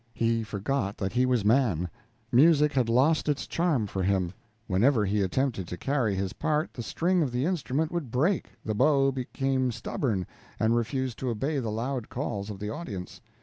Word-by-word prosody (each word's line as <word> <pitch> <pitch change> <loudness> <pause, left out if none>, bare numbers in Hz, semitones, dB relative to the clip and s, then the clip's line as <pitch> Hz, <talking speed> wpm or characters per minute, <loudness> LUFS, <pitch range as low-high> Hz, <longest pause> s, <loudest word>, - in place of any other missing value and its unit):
He 115 0 +1
forgot 105 0 -2
that 95 -1 -2
he 125 +1 +3
was 125 -5 +1
man; 105 - +3 0.4
music 150 +3 +5
had 125 -4 +1
lost 145 +7 +3
its 145 -1 0
charms 150 - 0
for 95 - -2
him; 95 -2 +1 0.3
whenever 110 +4 +3
he 100 +1 +1
attempted 100 -1 0
to 90 - -5
carry 120 - 0
his 95 0 -2
part, 155 0 -1
the 120 - -5
string 175 +9 +1
of 140 -5 0
the 125 +3 0
instrument 160 -3 -1
would 170 -7 -3
break, 155 - +1 0.2
the 110 - -1
bow 135 +4 +3
became 130 0 -1
stubborn, 105 -4 -2 0.3
and 110 +1 +3
refused 125 +1 -1
to 130 - -2
obey 135 +6 -1
the 115 -4 -2
loud 120 +2 -3
calls 110 -6 -3
of 105 - -5
the 105 +2 -4
audience. 110 - -6
125 Hz, 185 wpm, -28 LUFS, 105-140 Hz, 0.4 s, music